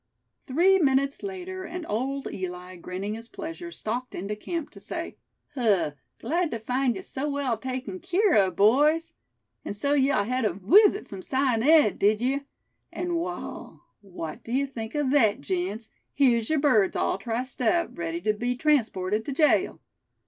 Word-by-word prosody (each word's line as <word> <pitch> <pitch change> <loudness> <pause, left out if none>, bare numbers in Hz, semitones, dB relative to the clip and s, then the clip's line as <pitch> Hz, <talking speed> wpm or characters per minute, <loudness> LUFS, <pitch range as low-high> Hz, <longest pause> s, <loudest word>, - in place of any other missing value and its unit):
Three 360 +8 +4
minutes 275 -2 +2
later, 375 -1 -6
and 360 -2 -6
Old 270 +6 -2
Eli, 180 0 -6
grinning 185 +4 -5
his 225 +1 -8
pleasure, 340 +1 -7
stalked 250 -4 -4
into 200 +4 -4
camp, 330 +8 -5
to - - -13
say: - - -5 0.4
"Huh! 215 - +2 0.3
glad 340 +2 0
tuh 230 - -3
find 250 +2 0
ye 190 - -7
so 280 +3 -3
well 280 -4 0
taken 250 -5 -5
keer 385 - +2
of, 190 -4 +3
boys. 300 - +3 0.5
An' - - -5
so 280 +8 0
yeou 275 -6 +3
hed 255 +2 -1
a 210 -5 +1
wisit 400 - +4
frum 195 -2 -8
Si 260 - -4
an' 255 -5 +2
Ed, 300 -4 +5
did 210 +1 +3
yeou; 260 +4 0 0.5
an' 350 0 -3
wall, 345 +1 -5 0.2
what 175 -6 -7
d'ye 260 +4 0
think 230 -3 -7
o' 295 -2 +1
thet, 245 -7 +3
gents, 185 +8 -3 0.2
here's 235 -5 +3
yer 315 - +2
birds 255 -10 +3
all - - 0
triced 245 +5 -2
up, 340 +7 +1
ready 170 0 -3
tew 215 +4 +1
be 245 +4 -2
transported 220 -8 +1
to - - -3
jail. 300 +2 +2
255 Hz, 170 wpm, -26 LUFS, 210-295 Hz, 0.5 s, Ed